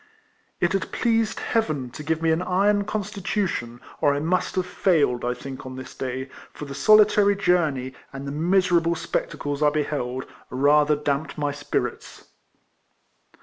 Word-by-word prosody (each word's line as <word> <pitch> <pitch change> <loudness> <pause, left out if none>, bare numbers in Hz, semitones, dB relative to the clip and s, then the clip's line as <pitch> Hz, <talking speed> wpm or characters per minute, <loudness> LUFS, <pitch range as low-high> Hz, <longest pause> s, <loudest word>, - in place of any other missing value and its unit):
It 175 +1 +1
had 195 - -2
pleased 225 -2 +1
Heaven 155 - -1
to - - -8
give 160 +2 -2
me 165 - +3
an 160 +2 +1
iron 200 +3 +2
constitution, 195 - -3 0.2
or 145 -1 +3
I - - -1
must 175 +4 0
have 185 -1 0
failed, 160 -9 +1
I 125 0 -1
think, 130 +1 -8
on 130 0 -8
this 130 0 -9
day, 130 0 -4 0.3
for 150 - -7
the 140 - -7
solitary 205 +6 +5
journey, 160 -9 +1 0.2
and 135 0 -7
the - - -3
miserable 170 +1 +2
spectacles 145 -2 -3
I 150 - +5
beheld, 140 -4 -2 0.2
rather 145 +3 +4
damped 145 +1 -2
my 145 -1 0
spirits. 145 0 -4
155 Hz, 150 wpm, -24 LUFS, 140-185 Hz, 0.3 s, solitary